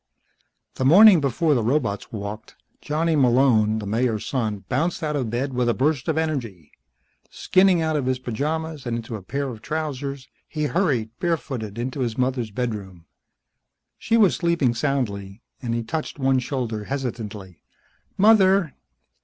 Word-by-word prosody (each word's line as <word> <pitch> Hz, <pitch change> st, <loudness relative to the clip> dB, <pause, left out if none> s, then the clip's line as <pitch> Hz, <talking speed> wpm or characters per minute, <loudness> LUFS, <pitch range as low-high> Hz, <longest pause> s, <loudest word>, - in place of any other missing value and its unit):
The -, -, -1 dB
morning 185 Hz, +5 st, +8 dB
before 150 Hz, +4 st, +1 dB
the 125 Hz, -, +1 dB
robots 115 Hz, -3 st, -1 dB
walked, 105 Hz, 0 st, -7 dB, 0.3 s
Johnny 160 Hz, +2 st, 0 dB
Malone, 120 Hz, -5 st, +3 dB
the 105 Hz, -, -5 dB
Mayor's 110 Hz, +1 st, -1 dB
son, 110 Hz, -7 st, -2 dB
bounced 170 Hz, 0 st, -1 dB
out 150 Hz, -1 st, -1 dB
of 130 Hz, -6 st, -1 dB
bed 130 Hz, +4 st, -2 dB
with 125 Hz, -1 st, +1 dB
a 120 Hz, -, +1 dB
burst 140 Hz, -1 st, 0 dB
of 160 Hz, -1 st, 0 dB
energy. 120 Hz, -, -3 dB, 0.6 s
Skinning 185 Hz, -3 st, +3 dB
out 160 Hz, -1 st, 0 dB
of 140 Hz, -4 st, -1 dB
his 130 Hz, 0 st, +1 dB
pajamas 150 Hz, +4 st, -3 dB
and 115 Hz, -1 st, -1 dB
into 115 Hz, 0 st, -6 dB
a 105 Hz, -, -7 dB
pair 140 Hz, +8 st, -3 dB
of 115 Hz, -4 st, -9 dB
trousers, 140 Hz, -3 st, -4 dB, 0.2 s
he 155 Hz, -1 st, -3 dB
hurried, 145 Hz, -, 0 dB
barefooted, 130 Hz, -, -3 dB
into 130 Hz, +4 st, -4 dB
his 120 Hz, -3 st, -2 dB
mother's 125 Hz, -3 st, -1 dB
bedroom. 100 Hz, -7 st, -5 dB, 0.9 s
She 230 Hz, -, +1 dB
was 205 Hz, -5 st, +4 dB
sleeping 170 Hz, -8 st, +1 dB
soundly, 110 Hz, -6 st, -3 dB, 0.2 s
and 115 Hz, -3 st, -2 dB
he 115 Hz, -, -2 dB
touched 155 Hz, +8 st, -4 dB
one 135 Hz, -1 st, +2 dB
shoulder 120 Hz, -5 st, -3 dB
hesitantly. 110 Hz, -, -5 dB, 0.6 s
"Mother!" 195 Hz, -5 st, +4 dB
130 Hz, 155 wpm, -23 LUFS, 110-155 Hz, 0.9 s, morning